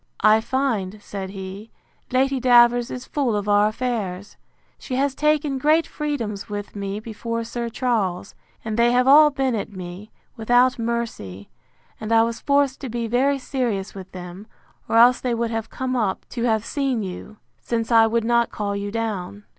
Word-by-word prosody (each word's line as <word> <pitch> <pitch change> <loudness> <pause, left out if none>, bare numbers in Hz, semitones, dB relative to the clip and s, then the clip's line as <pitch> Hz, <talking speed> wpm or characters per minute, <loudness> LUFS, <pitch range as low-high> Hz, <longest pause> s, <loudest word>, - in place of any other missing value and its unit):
I 215 +1 +6
find, 220 -7 -1
said 195 -2 -6
he, 195 +2 -8 0.4
Lady 265 +1 +2
Davers 240 0 +5
is 250 0 -6
full 265 -7 -1
of 205 0 -2
our 205 0 +4
affairs. 215 -5 -3 0.4
She 255 - -5
has 275 +1 +1
taken 300 -1 +1
great 310 +4 +3
freedoms 235 -10 -4
with 205 0 -6
me 200 0 -4
before 230 +1 -4
Sir 235 +1 -4
Charles; 215 -7 -1 0.3
and 220 +1 -2
they 240 +1 +4
have 250 +1 +3
all 300 +2 +8
been 270 -3 -1
at 210 -2 -3
me, 185 +2 -8 0.3
without 245 +3 +3
mercy; 225 - -4 0.5
and 220 0 -5
I 225 0 +5
was 230 0 -3
forced 280 -1 +1
to 265 - -5
be 235 0 -3
very 260 +5 +2
serious 245 -7 -3
with 190 -1 -10
them, 180 +3 -9 0.4
or 225 - +2
else 240 +2 +6
they 245 -2 -1
would 230 0 -2
have 225 -1 -3
come 260 0 -3
up 210 -6 -1
to 240 -1 -3
have 220 -2 +1
seen 270 -6 -1
you, 195 +3 -8 0.2
since 230 0 -2
I 225 -1 +6
would 230 0 0
not 235 0 +2
call 205 -1 -3
you 200 0 -3
down. 205 -3 -4
230 Hz, 180 wpm, -22 LUFS, 205-255 Hz, 0.5 s, all